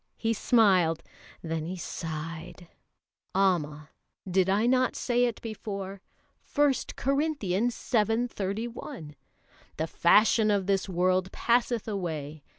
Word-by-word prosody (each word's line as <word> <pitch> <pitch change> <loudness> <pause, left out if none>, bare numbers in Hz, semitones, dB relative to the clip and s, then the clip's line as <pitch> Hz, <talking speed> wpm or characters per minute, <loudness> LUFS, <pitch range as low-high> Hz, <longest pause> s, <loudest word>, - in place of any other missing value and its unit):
He 225 0 0
smiled, 185 -8 +3 0.4
then 160 -1 -3
he 185 +2 -5
sighed. 165 +1 -6 0.7
"Amma! 155 -6 +1 0.4
did 190 0 +2
I 205 +4 +2
not 255 +1 +2
say 245 0 +1
it 235 -2 -2
before? 200 -3 -6 0.5
1 290 -1 +5 0.2
Corinthians 250 - 0
vii. 225 +1 +2
31: 215 - -5 0.6
'The 160 - 0
fashion 215 +6 +4
of 200 -2 +1
this 195 0 0
world 185 +1 +1
passeth 240 -1 +1
away.' 155 -7 -4
195 Hz, 110 wpm, -28 LUFS, 170-230 Hz, 0.7 s, 1